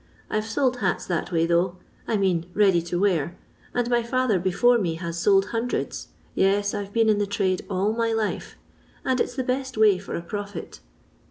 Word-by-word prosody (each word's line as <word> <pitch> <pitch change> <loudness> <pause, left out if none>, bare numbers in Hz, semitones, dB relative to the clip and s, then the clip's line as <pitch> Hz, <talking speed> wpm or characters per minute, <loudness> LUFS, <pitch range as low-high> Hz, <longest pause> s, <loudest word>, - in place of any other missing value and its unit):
I 215 - +1
've - - -8
sold 255 +3 0
hats - - -1
that 175 +1 -2
way 165 -1 +2
though, 175 +2 +1 0.3
I 220 - +1
mean 180 -3 0
ready 195 -5 +4
to 175 +1 -3
wear, 175 -5 +1 0.3
and 245 -1 0
my 240 -1 +2
father 235 -4 +1
before 235 +7 +3
mo 170 -6 -1
has 170 0 -4
sold 195 +2 +3
hundreds 235 +2 -2
— - - -33
yes, 200 +1 +2
I 205 -1 -2
've 195 - -16
been 225 +1 +2
in 215 -1 +3
the 205 - 0
trade 190 -2 0
all 200 +2 +1
ray 230 0 0
life 220 -2 -2 0.3
— - - -31
and 260 -1 +1
it - - +3
*s 245 - -11
the 260 - -1
best 260 0 -2
way 210 -4 +5
for 200 - -6
a 170 - -4
profit. 200 -1 -6
205 Hz, 220 wpm, -25 LUFS, 180-230 Hz, 0.3 s, way